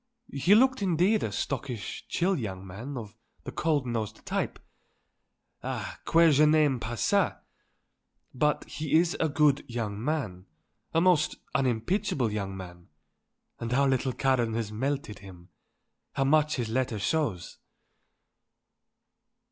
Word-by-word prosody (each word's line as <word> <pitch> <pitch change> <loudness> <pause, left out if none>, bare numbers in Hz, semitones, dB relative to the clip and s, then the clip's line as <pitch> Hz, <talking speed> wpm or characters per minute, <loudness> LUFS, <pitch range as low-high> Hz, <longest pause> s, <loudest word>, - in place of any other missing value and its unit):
"He 140 +9 +4
looked 260 +1 +4
indeed, 190 +3 +2
a 105 - -2
stockish, 125 -1 -4
chill 185 +3 +1
young 95 - -5
man, 115 +9 -7
of 110 -3 -7 0.3
the - - -6
cold 155 -5 0
nosed 110 -3 -4
type - - -2 1.0
ah, - - -5
que 165 -1 +6
je 145 +1 +5
n'aime 150 -4 +3
pas 115 0 -5
ça! - - +2 1.0
but 150 +3 +1
he 155 0 -2
is 170 +1 +3
a 160 - +2
good 145 -1 +3
young 110 -3 -3
man; 120 - -3 0.4
a 165 - +2
most 175 -3 +3 0.2
unimpeachable 130 - 0
young 100 -2 -3
man; 90 -2 -10 0.7
and 115 +1 -2
our 140 +1 +4
little 130 0 +1
Karen 125 -4 +1
has 115 -2 -2
melted 135 0 -3
him; 95 -3 -13 0.6
how 135 - +1
much 155 +2 +3
his 120 -5 -2
letter 120 -1 -1
shows." 100 - -2
130 Hz, 130 wpm, -28 LUFS, 110-155 Hz, 1.0 s, que